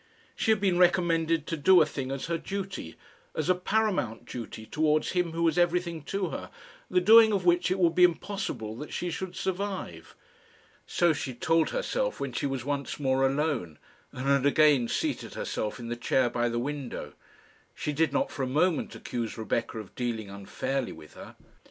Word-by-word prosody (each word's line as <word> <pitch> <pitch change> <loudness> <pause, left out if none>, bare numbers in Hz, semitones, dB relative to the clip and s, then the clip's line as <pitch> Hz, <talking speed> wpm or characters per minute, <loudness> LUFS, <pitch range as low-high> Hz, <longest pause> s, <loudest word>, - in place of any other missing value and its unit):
She - - -1
had 220 -1 +4
been 190 -3 +2
recommended 165 -3 +3
to 165 - -2
do 180 +5 +6
a - - +6
thing 135 -3 -5
as 135 -1 -3
her 165 0 -2
duty 195 - -5 0.4
as 155 +3 -1
a - - +7
paramount 180 - -1
duty 115 -3 -7
towards 155 +3 +1
him 180 -2 0
who 165 0 -1
was 165 0 +2
everything 175 -1 +1
to 195 -3 -2
her - - -6 0.4
the 185 - +3
doing 220 +4 +7
of 195 -3 0
which 175 0 +3
it 185 - +1
would 170 -3 +3
be 180 - +4
impossible 180 - 0
that 150 +4 -8
she 175 0 -3
should 180 +2 -5
survive. 185 - -4 0.7
So 175 -2 +3
she 135 -4 -4
told 165 +6 +2
herself - - -2
when 140 - -3
she 130 - -1
was 135 -3 -4
once 140 0 -3
more 135 -1 +2
alone, 135 - -1 0.3
and 130 - -6
had 140 0 +3
again 145 -4 +4
seated - - -2
herself 105 - -3
in 115 -1 -6
the 120 - -2
chair 120 +1 +1
by 120 0 0
the 120 - -2
window. 140 +1 -4 0.6
She 150 - -3
did 155 0 +2
not 140 - 0
for - - -5
a 130 - 0
moment 155 +5 +1
accuse 120 -2 -4
Rebecca 115 +1 -2
of 110 -3 -8
dealing 115 -5 -3
unfairly 125 +6 -3
with 75 - -14
her. - - -11
155 Hz, 190 wpm, -28 LUFS, 125-180 Hz, 0.7 s, a